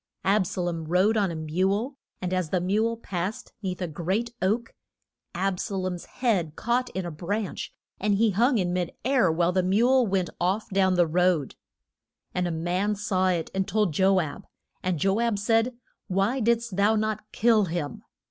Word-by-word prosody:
Ab 195 -1 +3
sa 180 - -3
lom 170 -2 -2
rode 185 +7 +3
on 205 -3 +2
a 170 - -4
mule, 190 - 0 0.3
and 180 0 -1
as 185 -4 0
the 185 - +1
mule 215 +6 +1
passed 190 -2 -4
'neath 185 -2 -3
a - - -1
great 190 +9 -2
oak, 225 +5 0 0.6
Ab 185 0 0
sa 200 - -3
lom's 185 -2 -3
head 190 - -1
caught 245 +2 0
in 190 -1 -2
a 175 - -4
branch, 190 +6 -3 0.3
and 205 0 +2
he 220 +1 +3
hung 235 +6 +3
in 180 -3 0
mid 180 -2 -1
air, 250 -10 +3
while 170 +2 +2
the 185 +1 +2
mule 235 +7 +3
went 190 -2 0
off 190 +5 0
down 190 -1 +3
the 175 -1 +4
road. 170 -3 +1 0.8
And 180 -1 0
a - - -2
man 180 +6 0
saw 195 -2 0
it 175 -3 0
and 190 0 -1
told 210 -4 +1
Jo 190 +3 +4
ab. 155 -5 -4 0.3
And 180 -2 -1
Jo 195 +6 +1
ab 235 -3 +1
said, 225 +4 +1 0.3
Why 195 +7 +1
did'st 235 -2 +1
thou 205 +2 +4
not 215 0 -2
kill 220 -2 +3
him? 165 -4 -4
190 Hz, 185 wpm, -26 LUFS, 180-215 Hz, 0.8 s, the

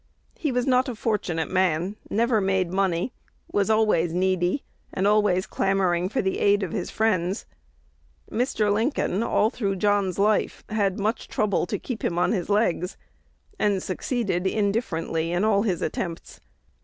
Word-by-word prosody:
He 300 - -2
was 250 0 0
not 255 0 +3
a 245 - -4
fortunate 190 -8 -1
man; 185 +1 +1
never 230 0 +2
made 190 -2 +1
money; 190 +2 0 0.4
was 200 +1 +1
always 215 -7 +3
needy, 185 +5 +1 0.3
and 190 - -1
always 205 -3 +3
clamoring 185 -2 +1
for 240 - -1
the 190 - -1
aid 205 0 +3
of 180 - -3
his - - -3
friends. 195 -3 0 0.9
Mr. 220 -4 +1
Lincoln, 220 - 0
all 225 -1 +2
through 200 -5 -1
John's 200 -2 +1
life, 210 +1 +1
had 200 -3 0
much 215 +4 -1
trouble 205 -4 0
to - - -2
keep 245 -4 -6
him 170 - -1
on 175 - +2
his 185 -5 -2
legs, 200 -4 +1 0.6
and 200 -3 +1
succeeded 190 -2 -1
indifferently 190 -6 -1
in 175 +3 +1
all 210 -2 +3
his 190 -6 -1
attempts. 165 +1 -4
200 Hz, 155 wpm, -25 LUFS, 180-215 Hz, 0.9 s, not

